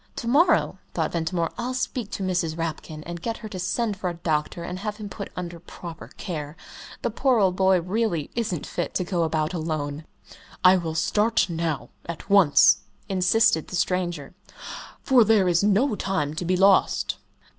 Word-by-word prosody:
"To 235 Hz, -, -5 dB
morrow," 315 Hz, +9 st, +3 dB, 0.2 s
thought -, -, 0 dB
Ventimore, 170 Hz, 0 st, -1 dB
"I'll 250 Hz, +2 st, -2 dB
speak 250 Hz, -3 st, -3 dB
to 195 Hz, -, -3 dB
Mrs. 175 Hz, -4 st, -1 dB
Rapkin, 155 Hz, -1 st, -5 dB
and 170 Hz, 0 st, -7 dB
get 230 Hz, +4 st, -3 dB
her 220 Hz, -2 st, -8 dB
to 190 Hz, -3 st, -6 dB
send 210 Hz, +4 st, -1 dB
for 185 Hz, -1 st, -3 dB
a 175 Hz, -, -5 dB
doctor 160 Hz, 0 st, -2 dB
and 180 Hz, +2 st, -5 dB
have 210 Hz, +1 st, -4 dB
him 210 Hz, -2 st, -7 dB
put 200 Hz, 0 st, -7 dB
under 175 Hz, -1 st, -6 dB
proper 170 Hz, 0 st, -9 dB
care 155 Hz, -4 st, -5 dB, 0.5 s
the 240 Hz, -, 0 dB
poor 255 Hz, +2 st, +2 dB
old 190 Hz, -4 st, +3 dB
boy 190 Hz, -1 st, +3 dB
really 180 Hz, -4 st, -1 dB
isn't 210 Hz, -9 st, -2 dB
fit -, -, -4 dB
to 185 Hz, -, +1 dB
go 175 Hz, -1 st, -1 dB
about 160 Hz, 0 st, 0 dB
alone!" 155 Hz, -2 st, -3 dB, 0.6 s
"I 185 Hz, 0 st, +8 dB
will 165 Hz, -3 st, -2 dB
start 210 Hz, +4 st, +2 dB
now 165 Hz, -2 st, -2 dB, 0.2 s
at 170 Hz, +4 st, -7 dB
once," 190 Hz, -8 st, +6 dB, 0.3 s
insisted 190 Hz, -1 st, +3 dB
the -, -, -6 dB
stranger 175 Hz, -5 st, -1 dB, 0.7 s
"for 255 Hz, -4 st, +6 dB
there 210 Hz, -3 st, +4 dB
is 175 Hz, +1 st, +3 dB
no 210 Hz, +6 st, +3 dB
time 190 Hz, -8 st, -1 dB
to 165 Hz, +3 st, -4 dB
be 185 Hz, +1 st, +1 dB
lost." 195 Hz, +1 st, +3 dB
180 Hz, 175 wpm, -25 LUFS, 165-210 Hz, 0.7 s, I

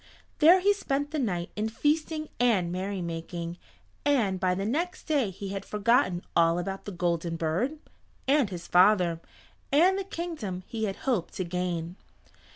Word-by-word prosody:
There 345 Hz, +4 st, +7 dB
he 405 Hz, +2 st, +4 dB
spent 285 Hz, -6 st, -2 dB
the 310 Hz, -, -1 dB
night 180 Hz, -9 st, -2 dB
in 215 Hz, +1 st, -1 dB
feasting 310 Hz, +5 st, 0 dB
and 210 Hz, -8 st, +3 dB
merry 190 Hz, +1 st, -3 dB
making, 170 Hz, +1 st, -5 dB, 0.4 s
and 225 Hz, -10 st, +2 dB
by 180 Hz, -1 st, +1 dB
the 195 Hz, +2 st, -2 dB
next 335 Hz, -, -2 dB
day 285 Hz, -9 st, +1 dB
he 195 Hz, +1 st, -7 dB
had 195 Hz, 0 st, -4 dB
forgotten 210 Hz, -4 st, +2 dB
all 165 Hz, 0 st, +4 dB
about 195 Hz, +2 st, -4 dB
the 205 Hz, -, -5 dB
Golden 170 Hz, -2 st, -1 dB
Bird, 170 Hz, -, -1 dB, 0.5 s
and 275 Hz, -5 st, +3 dB
his 175 Hz, -2 st, -7 dB
father, 180 Hz, -3 st, +4 dB, 0.5 s
and 360 Hz, +7 st, +4 dB
the -, -, -2 dB
kingdom 320 Hz, -, -5 dB
he 220 Hz, -1 st, -3 dB
had 195 Hz, -2 st, -3 dB
hoped 240 Hz, -10 st, 0 dB
to 185 Hz, -, -1 dB
gain. 175 Hz, 0 st, -3 dB
195 Hz, 160 wpm, -28 LUFS, 175-285 Hz, 0.5 s, There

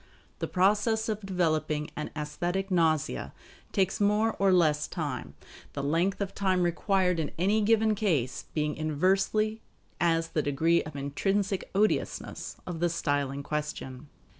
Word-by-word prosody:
The -, -, -2 dB
process 210 Hz, +4 st, +2 dB
of 215 Hz, -1 st, -2 dB
developing 155 Hz, -5 st, 0 dB
an 150 Hz, -, -4 dB
aesthetic 175 Hz, +6 st, -2 dB
nausea 160 Hz, -, +1 dB, 0.4 s
takes 190 Hz, 0 st, +1 dB
more 210 Hz, +2 st, +3 dB
or 195 Hz, -1 st, +4 dB
less 155 Hz, -5 st, +3 dB
time; 130 Hz, -, -4 dB, 0.4 s
the 140 Hz, -, -3 dB
length 170 Hz, +7 st, +1 dB
of 195 Hz, -1 st, -2 dB
time 185 Hz, -2 st, +1 dB
required 180 Hz, 0 st, +1 dB
in 155 Hz, -, -1 dB
any 200 Hz, +6 st, +2 dB
given 220 Hz, 0 st, +3 dB
case 165 Hz, -, 0 dB
being 150 Hz, -1 st, 0 dB
inversely 195 Hz, +8 st, +1 dB, 0.4 s
as 165 Hz, -1 st, +2 dB
the 155 Hz, -, 0 dB
degree 160 Hz, +4 st, +2 dB
of 155 Hz, -2 st, -9 dB
intrinsic 195 Hz, +8 st, -1 dB
odiousness 210 Hz, +2 st, -1 dB
of 175 Hz, -2 st, -5 dB
the 175 Hz, +1 st, +2 dB
style 145 Hz, -4 st, 0 dB
in 140 Hz, +1 st, -5 dB
question. 150 Hz, -2 st, -4 dB
175 Hz, 140 wpm, -29 LUFS, 150-195 Hz, 0.4 s, or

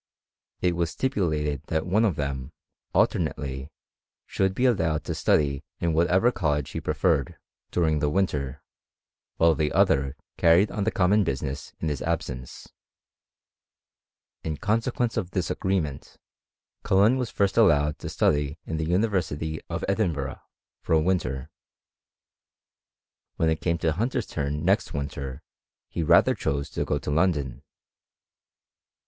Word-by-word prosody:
It 90 Hz, -1 st, +2 dB
was 85 Hz, -1 st, 0 dB
stipulated 75 Hz, -, -1 dB
that 80 Hz, -1 st, -1 dB
one 105 Hz, +5 st, +3 dB
of 95 Hz, -7 st, +1 dB
them, 70 Hz, -2 st, -3 dB, 0.4 s
alternately, 65 Hz, -1 st, 0 dB, 0.6 s
should 95 Hz, 0 st, 0 dB
be 125 Hz, -, +1 dB
allowed 80 Hz, -, +2 dB
to -, -, -3 dB
study 70 Hz, -3 st, +1 dB, 0.2 s
in 85 Hz, -1 st, 0 dB
whatever 90 Hz, +8 st, +3 dB
college 75 Hz, -, -1 dB
he -, -, -4 dB
preferred, 70 Hz, -, 0 dB, 0.3 s
during 80 Hz, -3 st, +1 dB
the 75 Hz, 0 st, +1 dB
winter, 75 Hz, -6 st, -1 dB, 0.7 s
while 80 Hz, 0 st, +5 dB
the 75 Hz, -2 st, 0 dB
other 70 Hz, +1 st, +2 dB, 0.2 s
carried 85 Hz, +5 st, +5 dB
on 100 Hz, -, -2 dB
the 110 Hz, -, +2 dB
common 100 Hz, +1 st, +3 dB
business 70 Hz, -3 st, -4 dB
in 80 Hz, -, -2 dB
his 75 Hz, -3 st, -3 dB
absence. 65 Hz, -7 st, -4 dB, 1.8 s
In 80 Hz, -2 st, -3 dB
consequence 115 Hz, +2 st, 0 dB
of 95 Hz, -6 st, -1 dB
this 90 Hz, -2 st, -2 dB
agreement, 85 Hz, -8 st, -2 dB, 0.6 s
Cullen 100 Hz, +6 st, +4 dB
was 125 Hz, -3 st, -2 dB
first 100 Hz, -1 st, 0 dB
allowed 75 Hz, -9 st, +4 dB
to -, -, -5 dB
study 75 Hz, 0 st, +1 dB
in 80 Hz, -, -3 dB
the 80 Hz, 0 st, -2 dB
University 85 Hz, -6 st, 0 dB
of -, -, -3 dB
Edin 100 Hz, -3 st, +1 dB
burgh, 70 Hz, -2 st, -5 dB, 0.4 s
for -, -, -1 dB
a 80 Hz, -, +6 dB
winter. 75 Hz, -5 st, -1 dB, 1.8 s
When 80 Hz, -1 st, +2 dB
it 80 Hz, -, -2 dB
came 85 Hz, -1 st, +1 dB
to 80 Hz, -1 st, +1 dB
Hunter's 115 Hz, +11 st, -1 dB
turn 75 Hz, +1 st, -3 dB
next -, -, +1 dB
winter, 70 Hz, -1 st, -5 dB, 0.5 s
he -, -, -3 dB
rather 80 Hz, -, +5 dB
chose 70 Hz, +1 st, -2 dB
to -, -, -2 dB
go 75 Hz, -, 0 dB
to 70 Hz, +1 st, -4 dB
London. 75 Hz, -6 st, +1 dB
80 Hz, 140 wpm, -26 LUFS, 75-95 Hz, 1.8 s, a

